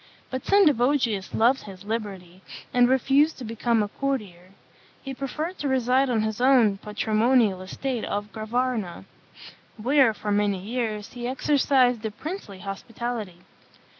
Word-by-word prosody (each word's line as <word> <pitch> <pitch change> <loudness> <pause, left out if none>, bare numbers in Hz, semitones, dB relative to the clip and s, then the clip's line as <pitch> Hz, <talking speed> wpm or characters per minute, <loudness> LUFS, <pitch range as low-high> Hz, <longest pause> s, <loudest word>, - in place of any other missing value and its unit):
But 260 0 -4
Sendivogius 265 - +2
loved 245 +4 +3
his 195 -1 -11
liberty, 195 -5 -5 0.3
and 245 0 +5
refused 275 +4 +3
to 260 - -8
become 230 0 0
a - - -2
courtier. 205 -9 -4 0.5
He 270 - -5
preferred 300 +7 -4
to 290 - -2
reside 260 0 +2
on 225 -3 +1
his 220 +1 -3
own 245 -7 +4
patrimonial 215 -1 +1
estate 240 +5 -4
of 205 +1 -4
Gravarna, 220 -4 -2 0.7
where, 250 0 +3
for 210 - -4
many 205 -1 +1
years, 215 +1 -4
he 240 -1 -5
exercised 255 -3 +2
a 220 - -1
princely 260 - -7
hospitality. 210 -1 -5
235 Hz, 135 wpm, -25 LUFS, 210-265 Hz, 0.7 s, and